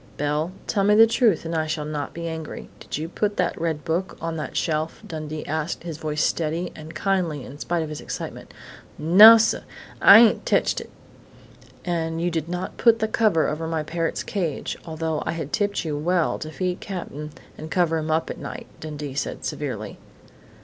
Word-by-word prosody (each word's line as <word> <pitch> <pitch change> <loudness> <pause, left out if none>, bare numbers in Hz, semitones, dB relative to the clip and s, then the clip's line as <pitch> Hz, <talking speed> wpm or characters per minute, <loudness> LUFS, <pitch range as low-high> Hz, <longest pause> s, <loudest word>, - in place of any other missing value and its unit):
"Belle, 150 +4 -1
tell 200 - 0
me 210 +1 +5
the 225 +1 +9
truth, 225 - +2
and 165 - -3
I 160 -1 0
shall 155 -1 -2
not 150 -1 -4
be 170 0 -5
angry: 160 -1 -6
did - - -5
you 155 +2 -3
put 205 +4 -2
that 175 -2 0
red 160 -3 -2
book 175 +3 -2
on 165 0 -3
that 155 - -4
shelf?" 155 -1 -1
Dundee 155 -1 -6
asked, 155 +2 -3
his 165 -3 -6
voice 150 -1 -1
steady 165 +2 -1
and 155 +1 -10
kindly 175 -8 -1
in 140 +2 -11
spite 170 0 -1
of 155 - -6
his 150 - -6
excitement. - - -7 0.5
"Nossuh! 215 +8 +8 0.4
I 200 - +10
ain't 230 - +4
teched - - +1
it!" - - -11 1.0
"And 165 -2 -1
you 175 +1 0
did 165 -1 -2
not 180 +1 -4
put 230 -2 +5
the 220 -1 0
cover 215 -7 +2
over 160 +2 -3
my 160 -1 -1
parrot's 165 +1 -2
cage, 175 -8 -3
although 160 -1 -2
I - - 0
had 160 -4 -5
tipped 205 -4 0
you 155 -2 -2
well 170 +3 +1
to 155 - -6
feed 180 +3 -2
Cap'n 150 -6 -6 0.3
and 155 - -8
cover 165 -2 +1
him 155 0 -4
at 160 +1 -1
night," - - -7
Dundee 150 -3 -6
said 140 - -4
severely. - - -4
165 Hz, 190 wpm, -24 LUFS, 155-180 Hz, 1.0 s, I